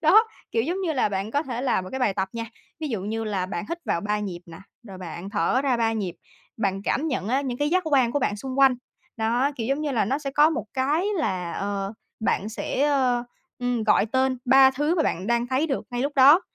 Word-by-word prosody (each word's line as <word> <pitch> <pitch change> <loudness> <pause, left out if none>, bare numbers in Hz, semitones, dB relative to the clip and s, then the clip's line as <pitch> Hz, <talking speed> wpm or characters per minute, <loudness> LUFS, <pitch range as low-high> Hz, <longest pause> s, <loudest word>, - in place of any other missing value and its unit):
Đó, 395 +8 +6 0.3
kiểu 225 - +1
giống 350 +9 -2
như 350 -4 0
là 260 -7 +1
bạn 195 +1 -3
có 285 +5 +1
thể 250 -5 -4
làm 250 -8 +1
một 185 - -9
cái 265 - -4
bài 210 -6 +2
tập 190 0 -1
nha, 230 0 -4 0.4
ví 310 - -2
dụ 225 -7 -2
như 220 +3 -3
là 195 -4 -1
bạn 175 -2 -4
hít 335 +1 -3
vào 170 - 0
3 210 +2 -1
nhịp 190 -4 -5
nè, 165 0 -11 0.3
rồi 190 -1 -9
bạn 180 +2 -7
thở 225 +11 +1
ra 265 -3 +2
3 225 -1 +1
nhịp, 200 -6 -3 0.4
bạn 195 -3 -1
cảm 315 +4 0
nhận 255 -8 -2
á 260 +4 +2
những 255 -3 -4
cái 290 +1 +1
giác 370 +2 +3
quan 265 -6 +3
của 290 - +2
bạn 210 -6 0
xung 260 +4 -5
quanh. 270 -2 +6 0.4
Đó, 235 +5 +1
kiểu 225 - -3
giống 275 +4 0
như 305 -1 -1
là, 230 - +2
nó 265 +8 0
sẽ 285 -2 -4
có 295 +3 +5
một 320 - -2
cái 290 +7 +1
là 185 - -1
ờ, 200 0 -3 0.3
bạn 215 -2 0
sẽ, 275 +6 -1 0.7
ừm, 245 -2 -1
gọi 215 - +4
tên 260 +2 +1
3 265 +1 +7
thứ 295 +5 0
mà 335 - +2
bạn 185 - -1
đang 235 +1 +1
thấy 260 +5 +1
được 275 -4 -2
ngay 245 0 -2
lúc 285 +2 -1
đó: 280 +6 +8
245 Hz, 250 wpm, -25 LUFS, 205-280 Hz, 0.7 s, đó